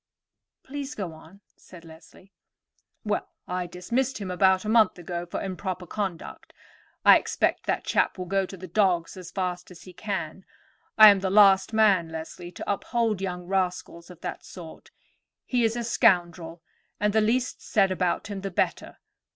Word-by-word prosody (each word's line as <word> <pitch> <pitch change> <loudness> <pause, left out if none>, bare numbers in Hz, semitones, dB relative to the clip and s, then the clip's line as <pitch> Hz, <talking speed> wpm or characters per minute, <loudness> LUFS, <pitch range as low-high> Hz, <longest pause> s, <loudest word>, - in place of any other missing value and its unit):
"Please, 285 +1 -6
go 185 -6 -5
on," 160 +5 -16
said 170 -2 -15
Leslie. 165 +4 -17 0.7
"Well, - - -2 0.2
I 180 0 -3
dismissed 235 +10 -2
him 195 -3 -5
a 190 0 +3
month 220 -4 +4
ago 175 0 -5
for - - -4
improper 185 -1 -5
conduct. 190 -2 -6 0.5
I - - +9
expect - - -1
that - - 0
chap - - 0
will 185 - -5
go 195 +1 0
to 195 - -10
the 185 +1 -9
dogs 180 -2 +1
as 185 -2 -9
fast 180 -2 -4
as 180 -2 -14
he 185 - -13
can. 190 -2 -5 0.5
I 215 -1 +11
am 200 -1 +4
the 190 0 -1
last 195 -1 +5
man, 200 -6 +3
Leslie, 160 +2 -8
to - - -4
uphold 220 0 -1
young 180 -2 -4
rascals 180 -2 -3
of 180 -2 -14
that - - -6
sort. 170 -4 -12 0.6
He 245 -2 0
is 225 0 +1
a 240 - -3
scoundrel, 175 -7 +1 0.4
and 210 0 +1
the 220 - +3
least 245 +4 0
said 195 -4 +2
about 180 -1 -1
him 200 -2 -6
the 195 - -4
better. 180 - -2
190 Hz, 165 wpm, -26 LUFS, 175-210 Hz, 0.7 s, I